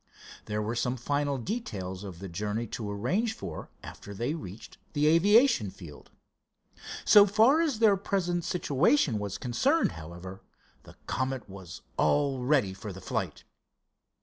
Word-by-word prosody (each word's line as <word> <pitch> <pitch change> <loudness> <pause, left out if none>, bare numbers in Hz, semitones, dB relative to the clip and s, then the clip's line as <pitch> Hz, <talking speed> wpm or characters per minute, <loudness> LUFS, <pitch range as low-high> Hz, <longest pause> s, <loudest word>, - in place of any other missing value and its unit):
There 105 0 -2
were 110 +2 -2
some 125 +2 -1
final 145 +2 -1
details 105 - -4
of 95 -4 -8
the 95 +3 -7
journey 105 +5 -3
to 110 -1 -5
arrange 135 - 0
for - - -7
after 100 - -9
they 120 +8 -1
reached 110 - -9
the 150 0 +1
aviation 195 - +5
field. 80 -6 -12 1.0
So 205 -1 +8
far 225 +10 +5
as 300 -8 0
their 215 -3 +5
present 175 -3 -1
situation 155 - +2
was 100 -2 -4
concerned, 270 - +1
however, 85 +3 -9 0.4
the - - -14
Comet 130 -2 -2
was 95 -3 -10
all 135 - +2
ready 125 -8 +2
for 100 +2 -7
the 95 - -9
flight. - - -4
125 Hz, 145 wpm, -29 LUFS, -, 1.0 s, So